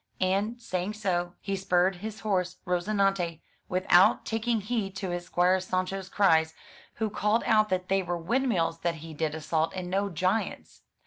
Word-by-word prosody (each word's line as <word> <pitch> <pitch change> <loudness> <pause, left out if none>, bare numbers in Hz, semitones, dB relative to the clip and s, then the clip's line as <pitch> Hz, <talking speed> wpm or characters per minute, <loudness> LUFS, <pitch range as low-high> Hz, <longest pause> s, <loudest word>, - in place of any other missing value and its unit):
And, 200 +5 0
saying 185 -3 -3
so, 175 -4 -1
he 195 - -2
spurred 185 -1 +2
his 215 +3 -7
horse 185 -4 -1
Rozinante, 180 -2 0 0.3
without 185 0 +4
tak 225 +1 -3
ing 230 -3 +2
heed 205 -2 -2
to 190 -2 -3
his 175 0 -4
Squire 180 +2 +3
Sancho*s 185 +1 -2
cries, 160 -6 +3 0.4
who 220 -2 -2
called 210 +3 +1
out 215 -1 +4
that 185 0 -1
they 195 0 +2
were 175 -1 -2
windmills 180 -4 0
that 170 0 -1
he 160 - -8
did 155 0 -2
assault 160 +2 -1
and 180 -1 -5
no 200 +1 +1
giants. 185 +5 -2
185 Hz, 170 wpm, -28 LUFS, 175-205 Hz, 0.4 s, without